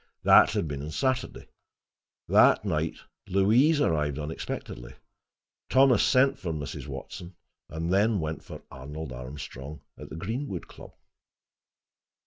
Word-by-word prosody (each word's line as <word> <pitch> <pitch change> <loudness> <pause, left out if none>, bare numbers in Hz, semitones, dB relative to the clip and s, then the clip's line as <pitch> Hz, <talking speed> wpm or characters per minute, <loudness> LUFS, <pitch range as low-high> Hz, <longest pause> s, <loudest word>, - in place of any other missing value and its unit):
That - - +7
had 80 - -1
been 70 -2 -5
on 75 - -6
Saturday. 130 - -2 0.8
That - - +5
night 80 -4 -1 0.3
Louise 115 - +3
arrived 75 - 0
unexpectedly. 75 -5 -6 0.7
Thomas 130 -4 +5
sent 135 +2 +3
for 90 -3 -4
Mrs. 75 -3 -6
Watson 90 -1 -8 0.3
and 80 +3 -3
then 105 +1 +3
went 80 -1 -4
for - - -10
Arnold 70 +2 -8
Armstrong 65 +2 -8 0.2
at - - -9
the - - -8
Greenwood 105 - -4
Club. - - -13
80 Hz, 120 wpm, -27 LUFS, 75-110 Hz, 0.8 s, That